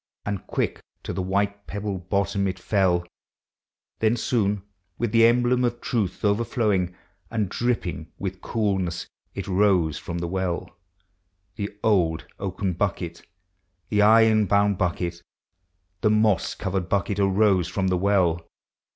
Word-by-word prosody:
And 100 -2 -4
quick - - -2 0.2
to - - -4
the 95 - -2
white 100 +2 -1
pebbled 100 -3 -4
bottom 100 0 +1
it 95 0 -3
fell; 90 -2 +1 0.9
Then 110 +2 +2
soon, 105 -4 0 0.3
with 120 -3 -1
the 115 0 +6
emblem 125 +1 +3
of 120 -1 0
truth 110 -4 -2
overflowing, 105 -4 +1 0.3
And 110 -4 -1
dripping 95 -9 -2
with 95 -1 -5
coolness, 95 -6 -1 0.3
it 100 0 -4
rose 90 -6 +2
from 85 - -5
the 85 0 -2
well; 90 -1 -3 0.4
— 95 0 -47
The 100 -1 -5
old 85 -7 +2
oaken 95 -1 -2
bucket, 85 -2 -2 0.7
the 105 -1 +2
iron 110 0 +5
bound 100 0 +3
bucket, 85 -1 -1 0.8
The 105 - +3
moss 105 -3 +2
covered 95 -1 -2
bucket, 100 0 0
arose 95 -2 +3
from 95 +1 -1
the 90 - +2
well. 90 -4 +2
100 Hz, 135 wpm, -25 LUFS, 90-105 Hz, 0.9 s, the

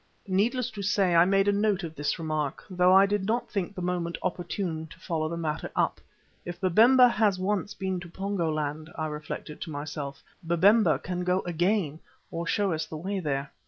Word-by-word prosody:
Needless 225 +6 +1
to 210 -2 -7
say, 195 -2 +2
I 170 +1 +6
made 195 +1 +3
a - - +5
note 200 -2 +1
of 165 -2 -5
this 145 -2 -2
remark, 155 -3 -3
though 180 0 +4
I 190 +1 +7
did 205 0 0
not 230 +4 -1
think 200 -1 -2
the 180 - -5
moment 175 -1 -2
opportune 175 -3 -3
to 150 - -15
follow 155 -2 -2
the 170 - -4
matter 155 -2 -3
up. - - 0 0.4
If 175 0 -7
Babemba 230 +8 +6
has 215 -5 +2
once 200 +2 -1
been 190 -2 -2
to 175 0 -10
Pongo 190 -2 -2
land, 155 +1 -3
I 155 - -2
reflected 150 0 -6
to 170 - -5
myself, 145 -1 -6 0.2
Babemba 170 0 +4
can 180 +4 -4
go 180 +1 +1
again 175 -2 0 0.3
or 170 0 -4
show 200 +1 +1
us 155 0 -3
the 155 - -6
way 195 +5 -3
there. 140 -4 -2
180 Hz, 195 wpm, -27 LUFS, 160-200 Hz, 0.4 s, I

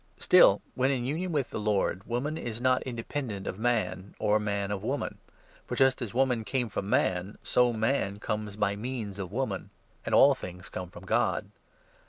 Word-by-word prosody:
Still, - - +6
when 130 +1 +2
in 130 -3 0
union 165 +7 -2
with 145 -5 -1
the - - -3
Lord, 100 -3 0
woman 125 +6 -1
is 120 -7 -5
not 130 +1 +3
n - - -4
independent 115 -4 -4
of 95 - -4
man, 110 -5 -1
or 105 0 +2
man 100 -1 -2
of 100 -2 -2
woman; - - -3 0.5
for - - -3
just 135 0 +3
as 115 -5 -3
woman 125 -1 +2
12 110 - -7
came 125 -1 0
from 100 -1 -4
man, 95 +1 +1
so 125 -1 +3
man 110 -3 0
comes 105 0 -3
by 105 -1 +1
means 110 -3 -5
of 95 -2 -5
woman; 110 -5 -2 0.3
and - - 0
all - - +8
things 90 0 -8
come 90 -1 -6
from 90 +1 -12
God. - - +1
110 Hz, 195 wpm, -29 LUFS, 100-125 Hz, 0.5 s, all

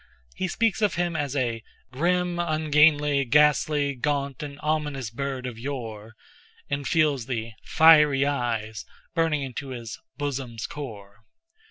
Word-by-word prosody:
He 185 - -2
speaks 225 +1 0
of 210 - +2
him 175 -1 -1
as 145 -3 -2
a 120 -4 -1 0.3
"grim, 175 +5 0
ungainly, 150 -3 +3
ghastly, 150 +1 +3
gaunt, 140 +1 -2
and 145 -1 -7
ominous 150 -6 -2
bird 135 +1 -4
of 120 -3 -6
yore," 115 -5 -6 0.6
and 140 -1 -2
feels 145 -6 +1
the 115 -3 -3
"fiery 150 -4 +6
eyes" 115 -6 -2 0.3
burning 160 -4 +1
into 135 +1 -6
his 120 -4 -7 0.2
"bosom's 135 -5 -4
core." 105 -8 -8
140 Hz, 130 wpm, -25 LUFS, 125-150 Hz, 0.6 s, fiery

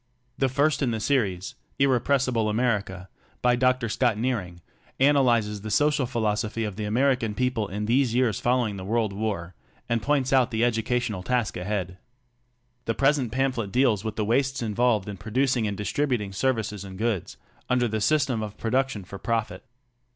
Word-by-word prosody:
The 135 - +2
first 145 +4 +1
in 135 - +2
the 115 -1 -2
series, 100 -8 0 0.2
"Irrepressible 130 -3 +2
America," 105 -5 -1 0.4
by 125 0 +4
Dr. 125 -1 +2
Scott 115 0 +1
Nearing, 105 -8 -2 0.4
analyzes 120 -7 +3
the 110 - -6
social 145 +3 +2
philosophy 110 -1 -1
of 105 -3 -4
the 105 - -4
American 120 0 +1
people 125 -4 0
in 105 +2 -4
these 120 +1 +2
years 120 -6 +2
follow 125 0 +2
ing 100 -2 -5
the 95 - -6
world 110 0 0
war 100 -4 -3 0.3
and 115 -1 0
points 135 0 +1
out 130 -2 +4
the 115 -1 +1
educational 115 -3 -1
task 120 +2 -1
ahead. 90 -1 -3 0.9
The 115 - -1
present 135 -4 +2
pamphlet 130 -5 -1
deals 120 -4 +2
with 110 -1 -4
the 105 - -1
wastes 130 +3 +1
involved 110 -2 +1
in 100 -1 -6
producing 120 +3 0
and 100 -1 -3
distributing 105 -1 -1
services 110 -3 -1
and 95 -1 -9
goods 110 -4 -2 0.3
under 125 -1 +2
the 110 -1 -2
system 135 -2 +2
of 105 -1 -6
production 125 -2 -1
for 100 +2 -9
profit. 115 -2 -2
115 Hz, 165 wpm, -25 LUFS, 105-130 Hz, 0.9 s, by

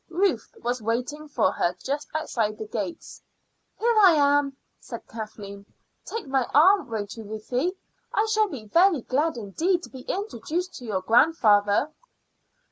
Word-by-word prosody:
Ruth 345 - 0
was 245 0 -1
waiting 250 +7 -3
for 295 - +1
her 175 +1 -1
just 285 +9 -4
outside 220 -9 -1
the 220 - -6
gates. 200 -4 -6 0.6
"Here 470 +1 +2
I 380 -4 +8
am," 285 -2 +2 0.2
said 235 - -9
Kathleen. 210 -3 -8 0.4
"Take 455 0 -5
my 265 -2 0
arm, 370 +1 +5
won't 205 -3 -4
you, 225 - -7
Ruthie? 235 - -2 0.4
I 425 - +2
shall 430 -1 +3
be 255 - -8
very 335 - +4
glad 285 +4 0
indeed 330 - -1
to - - -9
be 260 - -9
introduced 360 - -3
to 250 - -10
your 200 -4 -2
grandfather." 220 - +3
265 Hz, 150 wpm, -25 LUFS, 215-330 Hz, 0.6 s, I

